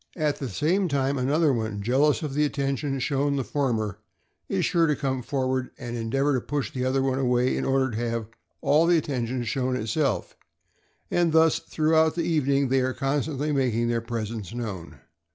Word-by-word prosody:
At 150 Hz, -3 st, 0 dB
the 135 Hz, -, -4 dB
same 175 Hz, -, +1 dB
time, 140 Hz, -2 st, 0 dB
another 145 Hz, +3 st, +2 dB
one, 110 Hz, -3 st, -2 dB
jealous 140 Hz, -, +2 dB
of 145 Hz, -3 st, -3 dB
the 150 Hz, +2 st, +2 dB
atten 140 Hz, -2 st, 0 dB
tion 135 Hz, 0 st, -3 dB
shown 140 Hz, +2 st, 0 dB
the 135 Hz, -, 0 dB
former, 115 Hz, -8 st, -1 dB, 0.5 s
is -, -, +1 dB
sure 170 Hz, -1 st, +3 dB
to 150 Hz, -, +2 dB
come 130 Hz, -2 st, -2 dB
forward 130 Hz, 0 st, -1 dB
and 120 Hz, 0 st, -6 dB
en 115 Hz, -1 st, -3 dB
deavor 135 Hz, +4 st, +2 dB
to 130 Hz, -, 0 dB
push 145 Hz, +1 st, -3 dB
the 125 Hz, -, -2 dB
other 130 Hz, +1 st, +1 dB
one 135 Hz, 0 st, 0 dB
away 125 Hz, -1 st, +2 dB
in -, -, -2 dB
order 135 Hz, -1 st, +1 dB
to 115 Hz, +2 st, -2 dB
have 115 Hz, -1 st, -2 dB, 0.4 s
all 155 Hz, +3 st, +4 dB
the 175 Hz, -1 st, +5 dB
attention 125 Hz, -5 st, -2 dB
shown 130 Hz, +1 st, -1 dB
itself; 125 Hz, +5 st, -1 dB, 0.8 s
and 175 Hz, -2 st, +2 dB
thus 160 Hz, -1 st, +4 dB
throughout 160 Hz, 0 st, +2 dB
the 170 Hz, -, 0 dB
evening 140 Hz, -4 st, +1 dB
they 135 Hz, +1 st, +3 dB
are 130 Hz, 0 st, 0 dB
constantly 145 Hz, +1 st, -1 dB
making 120 Hz, -4 st, +1 dB
their 115 Hz, -1 st, 0 dB
presence 115 Hz, -2 st, -5 dB
known. 100 Hz, -8 st, -6 dB
135 Hz, 190 wpm, -26 LUFS, 120-145 Hz, 0.8 s, the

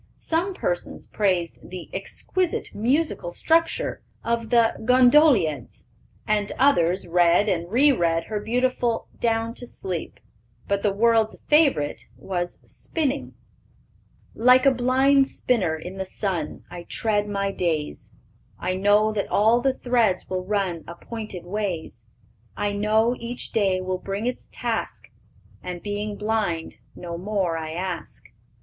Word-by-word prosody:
Some 350 Hz, +4 st, -1 dB
persons -, -, -3 dB
praised 185 Hz, -5 st, 0 dB
the 180 Hz, -1 st, -7 dB
"exquisite 365 Hz, -2 st, -2 dB
musical 255 Hz, -, 0 dB
structure" 325 Hz, -, +1 dB, 0.2 s
of 230 Hz, -1 st, -1 dB
the 235 Hz, -2 st, +4 dB
Gondolieds, 250 Hz, -, +4 dB, 0.4 s
and 210 Hz, -1 st, 0 dB
others 185 Hz, -10 st, +3 dB
read 175 Hz, +3 st, +4 dB
and 170 Hz, -2 st, -1 dB
re 280 Hz, +6 st, +5 dB
read 165 Hz, -8 st, +1 dB
her 215 Hz, -1 st, -3 dB
beautiful 245 Hz, +1 st, 0 dB
Down 230 Hz, 0 st, 0 dB
to 245 Hz, 0 st, -8 dB
Sleep. 180 Hz, -7 st, -6 dB, 0.5 s
But 200 Hz, 0 st, 0 dB
the 205 Hz, -, +2 dB
world's 225 Hz, +1 st, +2 dB
favorite 280 Hz, -, +2 dB
was 175 Hz, +5 st, -4 dB
Spinning: 285 Hz, -4 st, -3 dB, 1.0 s
"Like 250 Hz, +3 st, +5 dB
a 275 Hz, -, +7 dB
blind 265 Hz, +2 st, +3 dB
spinner 195 Hz, -15 st, 0 dB
in 180 Hz, +4 st, -8 dB
the 190 Hz, -, -2 dB
sun, 185 Hz, -5 st, -3 dB
I 175 Hz, -1 st, -8 dB
tread 210 Hz, -2 st, 0 dB
my 200 Hz, -1 st, -1 dB
days; 160 Hz, -6 st, -3 dB, 0.4 s
I 185 Hz, -, -2 dB
know 205 Hz, +3 st, +3 dB
that 205 Hz, -2 st, -1 dB
all 225 Hz, +4 st, +4 dB
the 270 Hz, 0 st, +1 dB
threads 235 Hz, -8 st, +1 dB
will 185 Hz, -1 st, -3 dB
run 190 Hz, -4 st, -1 dB
Appointed 185 Hz, +1 st, -7 dB
ways; 175 Hz, -, -4 dB, 0.5 s
I 205 Hz, -, 0 dB
know 215 Hz, +4 st, +2 dB
each 235 Hz, +1 st, -5 dB
day 195 Hz, -4 st, +2 dB
will 185 Hz, 0 st, -2 dB
bring 200 Hz, +4 st, -4 dB
its 250 Hz, 0 st, -4 dB
task, -, -, -4 dB, 0.5 s
And, 180 Hz, -1 st, -6 dB
being 205 Hz, 0 st, -3 dB
blind, 210 Hz, -6 st, -2 dB, 0.2 s
no 170 Hz, -1 st, -6 dB
more 190 Hz, -3 st, -1 dB
I 160 Hz, -1 st, -4 dB
ask. 180 Hz, +1 st, -5 dB
205 Hz, 130 wpm, -24 LUFS, 180-240 Hz, 1.0 s, a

